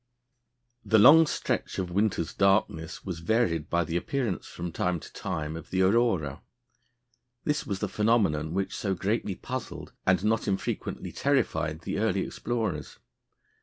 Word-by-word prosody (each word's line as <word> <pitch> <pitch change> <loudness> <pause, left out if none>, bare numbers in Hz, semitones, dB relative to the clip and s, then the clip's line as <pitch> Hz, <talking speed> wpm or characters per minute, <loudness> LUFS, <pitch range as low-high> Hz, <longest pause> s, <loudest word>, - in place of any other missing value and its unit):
The 110 - +3
long 160 +9 +8
stretch - - -2
of 90 -2 -2
winter's 95 -3 0
darkness 95 -5 +1
was 90 -4 -4
varied 85 -5 +1
by 85 0 +2
the 85 +1 -2
appearance, 120 0 -2
from 85 0 -6
time 90 +1 -1
to - - -13
time, 80 0 -4
of 80 - -9
the 95 0 +2
aurora. 95 - +2 1.0
This 150 0 -1
was 100 - -2
the 105 - 0
phenomenon 95 -8 +1
which 95 0 -1
so 95 -2 -1
greatly 100 +1 -1
puzzled, 130 +6 -6
and 95 +1 +3
not 110 0 +1
infrequently 95 -1 -3
terrified, 80 0 0
the 95 - -3
early 105 -3 +1
explorers. 110 -11 -3
95 Hz, 145 wpm, -28 LUFS, 85-110 Hz, 1.0 s, long